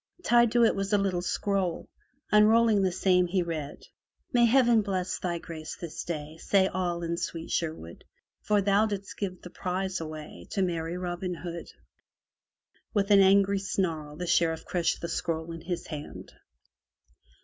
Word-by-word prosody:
Tied 235 -4 +4
to 240 -1 +5
it 225 - +5
was 195 +1 -2
a 205 - +4
little 190 -3 0
scroll. 185 0 -1 0.4
Unrolling 215 0 +5
the 190 -1 +2
same, 180 0 +3
he 180 +1 +1
read: 155 -4 -5 0.5
May 240 -1 +5
heaven 240 -2 +5
bless 185 -3 -2
thy 175 -2 -2
grace 160 -2 -7
this 170 -3 -6
day. 155 -2 -5
Say 190 +3 +3
all 175 -2 -2
in 170 0 -2
sweet 165 -1 -4
Sherwood; 155 - -3 0.4
For 210 -1 +2
thou 205 +2 +3
didst 200 -2 -5
give 185 -3 -4
the 180 - -9
prize 185 0 -3
away 155 - -8
To 195 - +1
merry 170 -1 -2
Robin 180 0 -3
Hood. 170 0 -7 1.3
With 200 0 +1
an 200 - +8
angry 195 +1 +5
snarl 165 -6 -2
the 180 - -4
Sheriff 165 -2 +1
crushed 170 -2 0
the 170 - -3
scroll 165 -1 -3
in 165 0 -7
his 175 +1 -4
hand. 150 -2 -8
180 Hz, 160 wpm, -28 LUFS, 165-200 Hz, 1.3 s, an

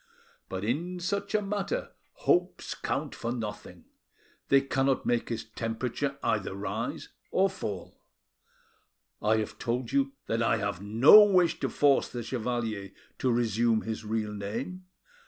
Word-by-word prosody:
But 95 +1 -4
in 170 +10 -2
such 200 +4 -2
a 210 - +2
matter 210 - -2 0.2
hopes 180 +1 0
count - - -3
for 115 - -4
nothing; 110 -4 -6 0.6
they 135 0 +6
cannot 135 -1 0
make 120 -1 0
his 115 -2 -3
temperature 120 +5 -3
either 95 -2 0
rise 100 - -4 0.2
or 190 0 +2
fall. 100 - -6 1.2
I 110 +1 +3
have 110 -1 -3
told 120 0 -2
you 135 0 +1
I 115 0 +2
have 100 -3 -3
no 115 - +8
wish 185 -4 +3
to - - -1
force 145 -2 +3
the 120 -1 -5
chevalier 115 -4 -3 0.3
to 130 - +2
resume 115 -1 +2
his 110 0 -4
real 110 -1 -2
name. 115 - -5
120 Hz, 135 wpm, -29 LUFS, 110-145 Hz, 1.2 s, no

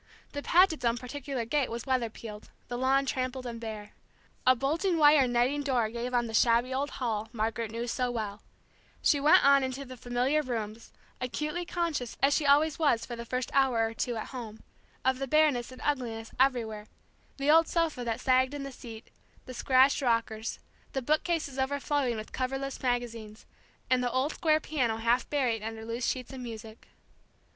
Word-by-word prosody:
The 285 - -4
Pagets' 335 -4 +4
own 235 0 +2
particular 255 0 -5
gate 280 +3 0
was 235 +1 -5
weather 255 -3 0
peeled, 215 -1 -10 0.2
the 245 - -3
lawn 270 +1 +3
trampled 255 -1 -2
and 235 -1 -6
bare. 215 -2 -6 0.6
A 255 - +7
bulging 325 +8 0
wire 295 -3 +6
netting 245 +4 +1
door 250 -6 +1
gave 240 +2 -4
on 240 -1 +1
the 225 - -6
shabby 235 +3 +3
old 280 +2 -1
hall 220 -3 -2
Margaret 225 0 -2
knew 230 +2 -4
so 245 +1 -1
well; 215 -4 -4 0.6
she 290 - +4
went 295 +1 +6
on 280 -1 +6
into 260 +1 -4
the 255 0 -9
familiar 250 +4 0
rooms, 230 -4 -5 0.3
acutely 305 +7 -3
conscious, 325 -9 -2
as 275 +1 +4
she 295 -1 +1
always 295 +2 +4
was 285 -8 +2
for 240 - -6
the 235 0 -7
first 255 0 -2
hour 260 -5 +3
or 225 - -4
two 240 +1 -2
at 220 - -5
home, 225 -4 -8 0.4
of 260 0 +2
the 270 - -3
bareness 285 -4 +2
and 255 - -11
ugliness 235 -6 -2
everywhere 225 -5 +1 0.5
the 280 +2 +2
old 325 +1 +6
sofa 330 -7 0
that 230 0 -2
sagged 260 +2 +2
in 285 - -5
the 275 - -6
seat, 230 -3 -11 0.3
the 255 - -8
scratched 260 +3 +4
rockers, 230 -3 0 0.4
the 270 - -2
bookcases 305 -1 0
overflowing 275 -1 0
with 215 - -7
coverless 270 +1 -3
magazines, 230 -4 -3 0.4
and 255 -1 +2
the 245 - +1
old 260 +5 0
square 310 -2 +2
piano 255 -8 -1
half 235 +2 +1
buried 250 -7 0
under 220 0 -6
loose 230 +2 -2
sheets 255 0 -3
of 265 - -7
music. 225 -2 -9
255 Hz, 185 wpm, -29 LUFS, 230-275 Hz, 0.6 s, A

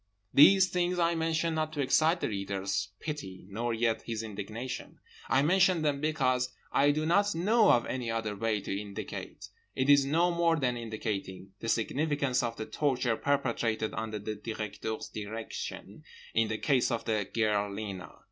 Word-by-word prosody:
These 190 +6 +7
things 180 0 0
I 170 -1 +2
mention 165 0 0
not 155 0 -1
to 150 - -5
excite 160 +5 +3
the - - 0
reader's 100 -1 -2
pity 115 -13 -6
nor 120 +4 -2
yet 115 0 0
his 115 -1 -4
indignation; 110 +4 -6 0.3
I 135 - +4
mention 180 0 +4
them 145 -2 0
because 130 -5 0 0.2
I 140 +1 +4
do 155 +2 +1
not 200 +4 +3
know 210 +6 +4
of 120 - +4
any 125 -3 -3
other 110 -2 -2
way 110 0 -1
to 95 - -3
indicate—it 105 +6 -6
is 140 -1 +7
no 165 +6 +2
more 170 -1 +2
than 130 -5 0
indicating—the 105 -3 -5
significance 140 +2 +1
of 115 -1 -2
the 110 - -5
torture 125 -5 0
perpetrated 120 -5 0
under 110 -1 -3
the 105 +1 -4
Directeur's 105 0 -5
direction 110 +2 -6 0.3
in 115 -1 +2
the 110 0 -2
case 130 -1 +2
of 115 -2 -2
the 105 -4 -1
girl 105 -3 +1
Lena. 100 -3 -6
120 Hz, 160 wpm, -30 LUFS, 110-155 Hz, 0.3 s, These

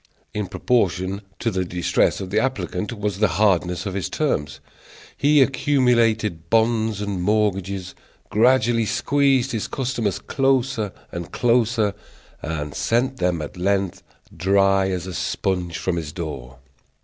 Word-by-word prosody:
In 105 -2 -2
proportion 100 -2 0 0.2
to 115 - -1
the 95 -2 -1
distress 90 0 +1
of 95 -1 -6
the - - +3
applicant 130 -4 -2
was 105 -4 -3
the 105 - +4
hardness 90 -3 +2
of 100 - -3
his 95 -1 -2
terms. 75 - -1 0.6
He 145 0 +5
accumulated 120 - +1
bonds 110 -2 +2
and 100 -3 -3
mortgages, 95 -2 0 0.4
gradually 115 0 +3
squeezed 135 +2 +2
his 110 -3 -2
customers 120 -7 -2
closer 135 -5 0 0.2
and 85 -1 -6
closer, 115 -3 +2 0.5
and 75 -2 -4
sent 130 +3 0
them 90 -6 0
at 75 - -8
length, 95 0 0 0.3
dry 95 +2 +3
as 90 -2 -3
a 95 - -6
sponge, 90 -1 -2
from 90 -2 -1
his 80 -3 -4
door. 70 -7 -6
100 Hz, 135 wpm, -22 LUFS, 90-120 Hz, 0.6 s, He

